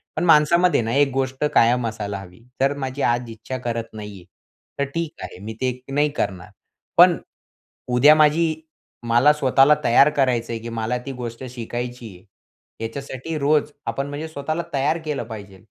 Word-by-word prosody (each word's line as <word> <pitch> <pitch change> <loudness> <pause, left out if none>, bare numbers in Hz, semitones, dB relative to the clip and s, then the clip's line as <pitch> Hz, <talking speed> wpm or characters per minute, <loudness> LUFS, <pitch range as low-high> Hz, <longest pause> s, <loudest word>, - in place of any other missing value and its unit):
पण - - -1
माणसामध्ये 170 +1 +4
ना, 115 0 -3
एक 140 0 +4
गोष्ट 135 +1 -2
कायम 120 +1 +4
असायला 105 -3 -4
हवी, 90 -2 -13 0.2
"तर 135 +1 +2
माझी 135 0 -4
आज 120 -1 0
इच्छा 115 +3 -6
करत 115 -2 -4
नाही 105 -1 -8
आहे. - - -18 0.5
तर - - +2
ठीक 165 -2 -3
आहे - - -8
मी 110 - -5
ते 125 -1 -1
नाही 145 +2 +2
करणार. 95 -1 -3 0.5
पण - - +7 0.8
उद्या 145 +5 +7
माझी 155 +1 +3 0.5
मला 120 +6 +5
स्वतःला 135 0 +4
तयार 120 +5 +6
करायचं 125 -4 +1
आहे 115 - -3
की 115 - -6
मला 115 +1 -2
ती 135 - -4
गोष्ट 120 +1 -6
शिकायची 120 0 -6
आहे." 90 - -18 0.6
याच्यासाठी 135 +5 -5
रोज 150 +1 +2
आपण 135 +1 -2
म्हणजे 145 +3 -5
स्वतःला 155 +2 -3
तयार 145 +4 +1
केलं 150 -5 -2
पाहिजे, 100 -4 -9
130 Hz, 170 wpm, -22 LUFS, 115-145 Hz, 0.8 s, पण